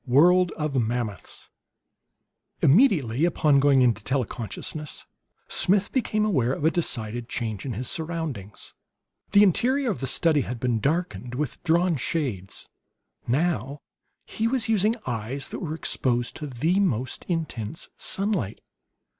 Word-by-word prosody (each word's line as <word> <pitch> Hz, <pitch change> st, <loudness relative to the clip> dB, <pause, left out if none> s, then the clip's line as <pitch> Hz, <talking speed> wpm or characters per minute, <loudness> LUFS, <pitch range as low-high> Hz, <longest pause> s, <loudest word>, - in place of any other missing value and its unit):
III 125 Hz, -, -4 dB
WORLD 180 Hz, +4 st, +6 dB
OF 150 Hz, -2 st, -3 dB
MAMMOTHS 115 Hz, -2 st, -4 dB, 1.1 s
Immediately 150 Hz, -, +4 dB
upon 155 Hz, -4 st, +3 dB
going 135 Hz, -2 st, +5 dB
into 115 Hz, -3 st, +2 dB
tele 130 Hz, 0 st, 0 dB
consciousness 130 Hz, +8 st, -6 dB, 0.4 s
Smith 200 Hz, +1 st, +2 dB
became 215 Hz, -5 st, +1 dB
aware 130 Hz, -, +1 dB
of 145 Hz, -, -3 dB
a 160 Hz, -, +5 dB
decided 120 Hz, -8 st, -3 dB
change 110 Hz, 0 st, -3 dB
in 125 Hz, -, -2 dB
his 120 Hz, +4 st, -3 dB
surroundings. 160 Hz, -, -5 dB, 0.6 s
The 205 Hz, 0 st, +8 dB
interior 250 Hz, -, +2 dB
of -, -, -4 dB
the 135 Hz, -, -3 dB
study 155 Hz, +2 st, +3 dB
had 125 Hz, -2 st, -5 dB
been 120 Hz, -2 st, 0 dB
darkened 140 Hz, -, -2 dB
with 145 Hz, -1 st, -3 dB
drawn 170 Hz, 0 st, +2 dB
shades; 125 Hz, -, -3 dB, 0.6 s
now 145 Hz, +1 st, 0 dB, 0.4 s
he 225 Hz, -, -1 dB
was 240 Hz, -2 st, 0 dB
using 220 Hz, 0 st, +2 dB
eyes 120 Hz, +3 st, -3 dB
that -, -, -6 dB
were 160 Hz, -4 st, -4 dB
exposed 120 Hz, -6 st, -1 dB
to 150 Hz, -, -5 dB
the 155 Hz, +9 st, 0 dB
most 130 Hz, -, 0 dB
intense 160 Hz, -, -3 dB
sunlight. 195 Hz, -, -1 dB
145 Hz, 140 wpm, -25 LUFS, 120-175 Hz, 1.1 s, The